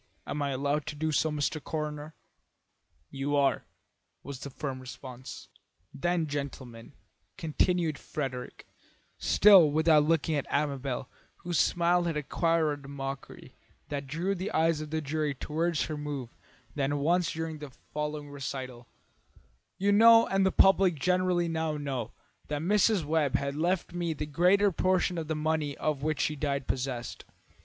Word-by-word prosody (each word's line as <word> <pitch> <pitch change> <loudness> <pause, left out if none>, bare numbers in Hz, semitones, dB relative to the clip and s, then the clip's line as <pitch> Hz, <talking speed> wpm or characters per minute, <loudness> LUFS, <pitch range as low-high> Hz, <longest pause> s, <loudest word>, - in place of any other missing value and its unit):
Am 145 - -3
I 140 - 0
allowed 140 +2 -1
to 150 - -4
do 155 +1 -1
so, 155 +2 +2
Mr. 150 0 -2
Coroner?" 150 0 -4 1.0
"You 140 +1 -2
are," 140 -1 +2 0.6
was 140 -3 -7
the 140 - -7
firm 135 -1 -5
response. 130 0 -9 0.5
"Then, 170 +3 0
gentlemen," 135 -5 -6 0.4
continued 165 0 0
Frederick, 130 -4 -5 0.5
still 195 -6 +7
without 155 0 +4
looking 160 -1 +1
at 145 -2 -1
Amabel, 140 -3 -1 0.4
whose 175 -1 0
smile 175 0 +2
had 165 -3 -1
acquired 150 -1 0
a - - -9
mockery 135 -1 -7 0.4
that 140 -1 -4
drew 170 +8 -1
the 190 +1 -4
eyes 160 -1 +2
of 155 - -6
the 160 +1 -2
jury 150 -1 -2
toward 165 +4 -1
her 155 - -2
more 145 -4 -5 0.4
than 145 0 0
once 170 +4 +1
during 160 -1 -4
the 145 -1 -8
following 150 +2 -6
recital, 130 -3 -6 0.9
"you 200 +2 +2
know, 230 +2 +7
and 195 0 +2
the - - +2
public 195 -2 +5
generally 180 +2 +1
now 160 -2 -1
know, 130 -6 -4 0.4
that 150 0 -3
Mrs. 205 -1 +3
Webb 150 -3 +1
has 140 0 -1
left 175 +4 -1
me 175 -2 -1
the 150 0 -4
greater 180 +7 +3
portion 185 -1 +1
of 160 - -5
the 160 - -1
money 155 -2 -1
of 150 -3 -1
which 155 0 -1
she 150 - 0
died 140 -2 -2
possessed. 125 -2 -3
150 Hz, 150 wpm, -29 LUFS, 140-170 Hz, 1.0 s, still